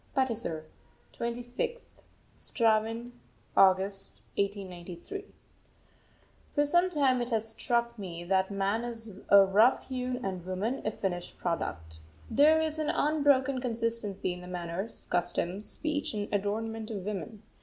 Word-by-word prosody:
PATISAR, 225 Hz, -, 0 dB, 0.5 s
26th 245 Hz, -, -4 dB, 0.3 s
(Straven) 225 Hz, +1 st, +1 dB, 0.4 s
August 195 Hz, +1 st, +4 dB, 0.2 s
1893. 195 Hz, -, -4 dB, 1.3 s
For 290 Hz, -1 st, +4 dB
some 345 Hz, +5 st, +4 dB
time 275 Hz, -7 st, +3 dB
it 240 Hz, -, -2 dB
has 225 Hz, -2 st, 0 dB
struck 235 Hz, +1 st, 0 dB
me 175 Hz, -3 st, -6 dB
that 190 Hz, +1 st, +2 dB
man 200 Hz, +3 st, 0 dB
is 225 Hz, -4 st, -4 dB
a 200 Hz, -1 st, +9 dB
rough 215 Hz, +9 st, +4 dB
hewn 250 Hz, -1 st, -2 dB
and 185 Hz, -3 st, -3 dB
woman 190 Hz, +8 st, -2 dB
a -, -, +3 dB
finished 180 Hz, -4 st, -3 dB
product. 80 Hz, -, -3 dB, 0.3 s
There 310 Hz, +3 st, +6 dB
is 315 Hz, -1 st, -1 dB
an 310 Hz, -, 0 dB
unbroken 280 Hz, -3 st, +3 dB
consistency 230 Hz, -6 st, -1 dB
in 180 Hz, -, -9 dB
the 180 Hz, -, -9 dB
manners, 180 Hz, +3 st, -4 dB
customs, 175 Hz, +3 st, 0 dB
speech, 300 Hz, -6 st, -2 dB
and 205 Hz, -1 st, -2 dB
adornment 220 Hz, +2 st, -1 dB
of 200 Hz, -4 st, -4 dB
woman. 210 Hz, +1 st, -5 dB
220 Hz, 125 wpm, -30 LUFS, 190-250 Hz, 1.3 s, a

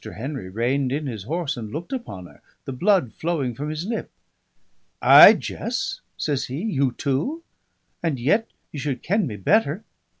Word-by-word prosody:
Henry 130 Hz, -4 st, -5 dB
reined 125 Hz, +6 st, 0 dB
in 145 Hz, +2 st, -2 dB
his 110 Hz, -7 st, -5 dB
horse 160 Hz, +2 st, -2 dB
and 110 Hz, -4 st, -7 dB
looked 170 Hz, -, -6 dB
upon 165 Hz, -, -6 dB
her, -, -, -17 dB, 0.2 s
the -, -, -5 dB
blood 175 Hz, -, +2 dB
flowing 155 Hz, -6 st, -2 dB
from 145 Hz, +6 st, -5 dB
his 155 Hz, +3 st, -4 dB
lip. 225 Hz, +2 st, -4 dB, 0.9 s
"Ay, -, -, +10 dB
Jess?" 230 Hz, -1 st, -4 dB, 0.2 s
says 140 Hz, -3 st, -1 dB
he. 130 Hz, +4 st, -5 dB
"You 140 Hz, -, 0 dB
too? 155 Hz, -, -2 dB, 0.6 s
And 160 Hz, -6 st, -1 dB
yet 205 Hz, -, +2 dB, 0.2 s
ye 145 Hz, -, -6 dB
should 140 Hz, -2 st, -3 dB
ken 200 Hz, 0 st, +1 dB
me 110 Hz, -, -5 dB
better." 180 Hz, -, +1 dB
145 Hz, 165 wpm, -23 LUFS, 125-180 Hz, 0.9 s, Ay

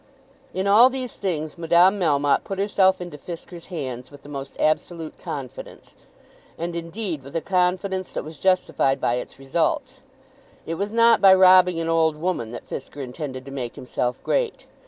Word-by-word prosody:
In 190 Hz, +1 st, -2 dB
all 215 Hz, +6 st, +7 dB
these 255 Hz, -2 st, -5 dB
things 165 Hz, -4 st, -3 dB
Madame 175 Hz, +4 st, +4 dB
Melmotte 145 Hz, -5 st, +2 dB
put 195 Hz, -, -5 dB
herself 190 Hz, -2 st, +2 dB
into 175 Hz, -4 st, -7 dB
Fisker's 170 Hz, +1 st, -9 dB
hands 130 Hz, -8 st, -5 dB
with 145 Hz, -1 st, -15 dB
the 145 Hz, -, -12 dB
most 140 Hz, -1 st, -7 dB
absolute 160 Hz, +1 st, -1 dB
confidence, -, -, -8 dB, 0.6 s
and, 170 Hz, +1 st, -4 dB
indeed, 170 Hz, -1 st, -4 dB
with 135 Hz, +3 st, -12 dB
a -, -, +2 dB
confidence 185 Hz, +2 st, 0 dB
that -, -, -3 dB
was 155 Hz, +1 st, -10 dB
justified 165 Hz, -7 st, +2 dB
by 120 Hz, -, +1 dB
its -, -, -7 dB
results. 255 Hz, -, -1 dB, 0.6 s
It 165 Hz, -, -3 dB
was 200 Hz, +5 st, -3 dB
not 230 Hz, 0 st, +5 dB
by 190 Hz, -1 st, +8 dB
robbing 185 Hz, -2 st, +6 dB
an 165 Hz, -, -2 dB
old 165 Hz, -1 st, +2 dB
woman 155 Hz, -8 st, -2 dB
that 120 Hz, -, -9 dB
Fisker 140 Hz, +1 st, -6 dB
intended 130 Hz, 0 st, -6 dB
to 135 Hz, -, -9 dB
make 125 Hz, -4 st, -5 dB
himself 125 Hz, 0 st, -2 dB
great. -, -, -1 dB
170 Hz, 170 wpm, -23 LUFS, 145-190 Hz, 0.6 s, by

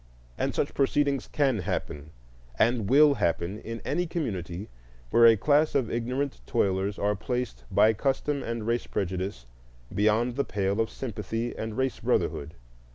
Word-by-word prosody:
And -, -, -2 dB
such -, -, -1 dB
proceedings 140 Hz, -1 st, +1 dB
can 135 Hz, -6 st, +1 dB
happen, 75 Hz, -4 st, -4 dB, 0.5 s
and 115 Hz, -, +2 dB
will 145 Hz, +2 st, +7 dB
happen, 85 Hz, +4 st, -1 dB
in 115 Hz, 0 st, -7 dB
any 175 Hz, 0 st, 0 dB
community 100 Hz, -, -4 dB, 0.4 s
where 115 Hz, 0 st, +7 dB
a 115 Hz, -1 st, +6 dB
class 150 Hz, +7 st, +3 dB
of 130 Hz, -5 st, +1 dB
ignorant 125 Hz, -, -2 dB
toilers 95 Hz, +1 st, 0 dB
are 105 Hz, +1 st, +1 dB
placed 115 Hz, -, -4 dB
by 110 Hz, -, +5 dB
custom 140 Hz, +4 st, -1 dB
and 115 Hz, -2 st, -4 dB
race 120 Hz, +1 st, -1 dB
prejudice 95 Hz, -8 st, -3 dB, 0.5 s
beyond 110 Hz, +5 st, +2 dB
the 140 Hz, -, +2 dB
pale 100 Hz, 0 st, 0 dB
of 110 Hz, -, -1 dB
sympathy 115 Hz, 0 st, -4 dB
and 110 Hz, -1 st, -5 dB
race 130 Hz, -1 st, -1 dB
brotherhood. 75 Hz, +3 st, -1 dB
115 Hz, 150 wpm, -27 LUFS, 100-130 Hz, 0.5 s, will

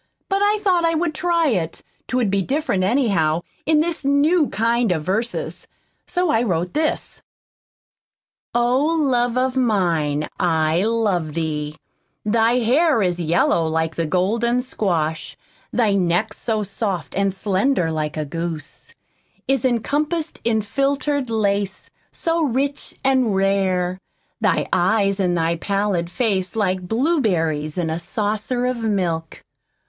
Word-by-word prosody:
But 390 Hz, 0 st, +1 dB
I 415 Hz, +1 st, +3 dB
thought 365 Hz, -4 st, +3 dB
I 330 Hz, 0 st, +2 dB
would 330 Hz, 0 st, 0 dB
try 335 Hz, +1 st, +1 dB
it 170 Hz, -8 st, -2 dB, 0.2 s
'twould 250 Hz, -6 st, 0 dB
be 200 Hz, 0 st, +2 dB
different, 265 Hz, -, 0 dB
anyhow, 185 Hz, -, +2 dB, 0.3 s
in 310 Hz, -1 st, +4 dB
this 335 Hz, -1 st, -2 dB
new 290 Hz, +3 st, +3 dB
kind 230 Hz, +1 st, +1 dB
of 160 Hz, -3 st, -1 dB
verses. 215 Hz, +8 st, -3 dB, 0.4 s
So 360 Hz, -3 st, +1 dB
I 225 Hz, -, +3 dB
wrote 180 Hz, -6 st, -1 dB
this: 310 Hz, 0 st, -2 dB, 1.3 s
Oh, 245 Hz, +3 st, +3 dB
love 260 Hz, -7 st, +1 dB
of 255 Hz, 0 st, +1 dB
mine, 170 Hz, -, +1 dB
I 160 Hz, -2 st, +2 dB
love 205 Hz, -9 st, 0 dB
Thee. 150 Hz, -2 st, -2 dB, 0.5 s
Thy 225 Hz, +2 st, +3 dB
hair 270 Hz, +1 st, +3 dB
is 180 Hz, -1 st, 0 dB
yellow 165 Hz, 0 st, +2 dB
like 160 Hz, 0 st, -1 dB
the 165 Hz, -1 st, -2 dB
Golden 230 Hz, +8 st, +1 dB
squash. 165 Hz, -10 st, -2 dB, 0.3 s
Thy 220 Hz, -4 st, +2 dB
neck 185 Hz, +2 st, +1 dB
so 220 Hz, -2 st, -2 dB
soft 200 Hz, -2 st, -3 dB
An' 195 Hz, 0 st, +2 dB
slender 195 Hz, 0 st, 0 dB
like 155 Hz, -1 st, -3 dB
a 155 Hz, -, -2 dB
goose, 165 Hz, 0 st, -6 dB, 0.5 s
Is 270 Hz, 0 st, +1 dB
encompassed 295 Hz, +7 st, -1 dB
in 220 Hz, -2 st, +1 dB
filtered 275 Hz, +3 st, 0 dB
lace 205 Hz, -2 st, -1 dB, 0.2 s
So 330 Hz, 0 st, -1 dB
rich 280 Hz, +1 st, -2 dB
an' 260 Hz, -5 st, +2 dB
Rare. 190 Hz, -2 st, +1 dB, 0.4 s
Thy -, -, +1 dB
eyes 195 Hz, +2 st, +2 dB
in 180 Hz, -2 st, +1 dB
thy 165 Hz, 0 st, 0 dB
pallid 195 Hz, -2 st, -1 dB
face 195 Hz, -4 st, -1 dB
like 185 Hz, -4 st, 0 dB
Blueberries 185 Hz, -, 0 dB
in 165 Hz, -3 st, -1 dB
a 160 Hz, -, -2 dB
Saucer 215 Hz, +6 st, -2 dB
of 250 Hz, 0 st, 0 dB
milk. 180 Hz, -8 st, -2 dB
210 Hz, 135 wpm, -21 LUFS, 175-260 Hz, 1.3 s, in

